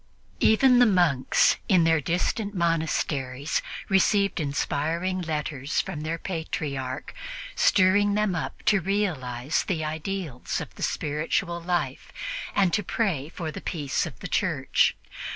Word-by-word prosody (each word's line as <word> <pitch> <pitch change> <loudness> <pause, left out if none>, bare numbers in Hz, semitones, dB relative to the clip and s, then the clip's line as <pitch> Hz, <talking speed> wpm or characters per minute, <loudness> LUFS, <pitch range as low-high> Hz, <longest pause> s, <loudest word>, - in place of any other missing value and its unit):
Even 250 +3 +5
the 245 - +7
monks 175 -10 +3
in 180 -4 +5
their 165 -1 +3
distant 200 - -1
monasteries 155 -5 0 0.3
received 195 0 +3
inspiring 160 +5 -1
letters 150 -3 -2
from 175 -6 -3
their 160 +2 -2
Patriarch, 145 -7 -4 0.4
stirring 205 +1 +4
them 210 -2 +1
up 165 - -4
to 200 -3 +4
realize 155 -9 -1
the 160 -5 -2
ideals 155 -3 -3
of - - -7
the - - -13
spiritual 165 +4 -1
life 165 -6 -2 0.4
and 195 -4 +3
to 210 - +2
pray 170 - -1
for 165 -2 -5
the - - -7
peace 145 -5 -2
of - - -11
the - - -4
Church. - - +2
165 Hz, 130 wpm, -26 LUFS, 150-195 Hz, 0.4 s, the